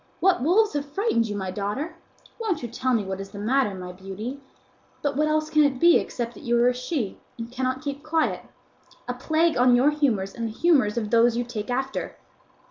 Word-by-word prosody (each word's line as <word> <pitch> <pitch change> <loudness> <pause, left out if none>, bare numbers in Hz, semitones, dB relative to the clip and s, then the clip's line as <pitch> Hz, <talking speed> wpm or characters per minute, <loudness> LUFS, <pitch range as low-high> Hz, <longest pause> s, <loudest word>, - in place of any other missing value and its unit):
What 375 -5 +3
wolves 405 - +3
have 290 -1 -2
frightened 285 - 0
you, 205 - -4
my 190 -2 -3
daughter? 210 - -3 0.4
Won't 430 - -1
you - - -2
tell 255 +3 -2
me 220 - +1
what 190 0 -4
is 195 - -8
the 205 - -11
matter, 220 0 +1
my 180 -1 -7
beauty? 195 +9 -7 0.6
But 285 -2 0
what 305 +2 +2
else 310 0 0
can 305 -1 +5
it 275 -3 +1
be 340 +3 +7
except 240 -1 -4
that - - -13
you 240 0 +1
are 240 +1 +5
a - - 0
she, 250 - -3 0.2
and 230 0 -7
cannot 260 +1 -2
keep 285 -1 -4
quiet? 315 +1 0 0.7
A 250 - -1
plague 315 +6 +1
on 250 0 +6
your 265 +5 +4
humours 240 -11 0
and 230 -1 -3
the 220 - -6
humours 270 -11 +3
of 215 -3 -2
those 235 0 +4
you 240 - +1
take 230 -3 -6
after! 265 +2 -3
250 Hz, 215 wpm, -25 LUFS, 220-300 Hz, 0.7 s, be